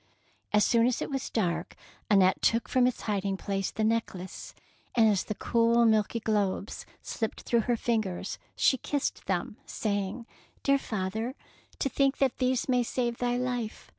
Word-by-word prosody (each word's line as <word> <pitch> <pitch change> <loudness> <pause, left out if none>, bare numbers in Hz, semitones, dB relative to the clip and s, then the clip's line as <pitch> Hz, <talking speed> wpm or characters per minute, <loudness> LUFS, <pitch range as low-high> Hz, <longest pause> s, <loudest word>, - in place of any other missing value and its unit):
^' - - -37 0.5
As 210 -1 +4
soon 235 0 +4
as 250 - 0
it - - -4
was 270 -1 -2
dark, 180 -7 -1 0.3
Annette 190 -2 +4
took 230 0 +2
from 250 -1 +3
its 255 - -2
hiding 200 -2 -1
place 195 -1 -2
the 220 - -3
neck 225 -2 +1
lace, 185 +1 -8 0.4
and 230 -2 +6
as 205 -3 +2
the 215 - -4
cool, 235 +1 +3
milky 220 +1 +2
globes 205 -2 -1 0.2
slipped 225 -2 -3
through 235 -2 +1
her 240 - +3
fingers, 215 -6 -2 0.2
she 265 - +3
kissed 285 -2 -2
them, 190 +3 -1
saying, 205 +2 -2 0.2
— - - -34
"Dear 275 0 +4
father, 220 +3 -3 0.4
to - - 0
think 275 +1 +1
that 270 -3 +1
these 255 -1 +1
may 250 -2 +3
save 240 0 -1
thy 245 0 +1
life. 245 -3 -3
230 Hz, 175 wpm, -29 LUFS, 205-245 Hz, 0.5 s, and